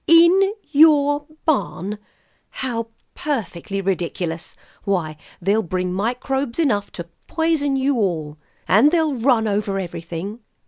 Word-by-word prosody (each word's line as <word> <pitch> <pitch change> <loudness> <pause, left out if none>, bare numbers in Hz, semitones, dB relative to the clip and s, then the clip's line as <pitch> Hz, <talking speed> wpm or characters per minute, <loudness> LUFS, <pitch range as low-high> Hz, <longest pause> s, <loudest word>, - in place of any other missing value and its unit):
"In 345 +4 +6 0.2
your 290 -1 +5 0.2
barn? 205 - -1 0.5
How 235 -3 -3 0.3
perfectly 195 - -3
ridiculous! 175 -3 -3 0.3
Why, 175 -6 -1 0.2
they'll 200 +5 +2
bring 180 -1 -2
microbes 250 +5 -2
enough 225 -11 +1
to 170 -1 -6 0.2
poison 320 -4 +1
you 270 0 +1
all. 160 -8 -1 0.3
And 220 +10 +6
they'll 320 -3 +2
run 235 -3 +2
over 205 -1 -1
everything." 175 +3 -5
220 Hz, 110 wpm, -21 LUFS, 185-285 Hz, 0.5 s, In